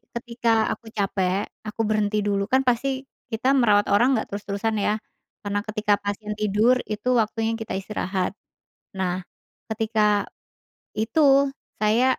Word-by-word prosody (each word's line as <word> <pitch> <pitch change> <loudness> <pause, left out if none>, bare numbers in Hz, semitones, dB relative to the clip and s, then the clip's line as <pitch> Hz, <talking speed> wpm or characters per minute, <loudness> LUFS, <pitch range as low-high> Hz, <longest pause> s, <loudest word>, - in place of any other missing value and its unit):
ketika 235 -1 -2 0.2
aku 230 - -12
capek, 195 -1 0 0.2
aku 225 +1 -3
berhenti 210 0 +1
dulu, 200 -1 0
kan 260 +4 +3
pasti 260 +2 0 0.3
kita 225 +3 -1
merawat 210 -6 +4
orang 205 +5 +5
nggak 220 - -1
terus-terusan 205 +2 -2
ya, 210 +1 +1 0.5
karena 205 0 -1
ketika 215 -1 +1
pasien 205 +1 -4
tidur 215 +4 +3
itu 215 +2 -4
waktunya 225 +1 -1
kita 225 - -5
istirahat. 190 -1 -2 0.7
Nah, 185 -1 -1 0.5
ketika 215 -2 +1 0.7
itu 275 +5 +4 0.3
saya 220 +4 +4
215 Hz, 130 wpm, -24 LUFS, 205-235 Hz, 0.7 s, orang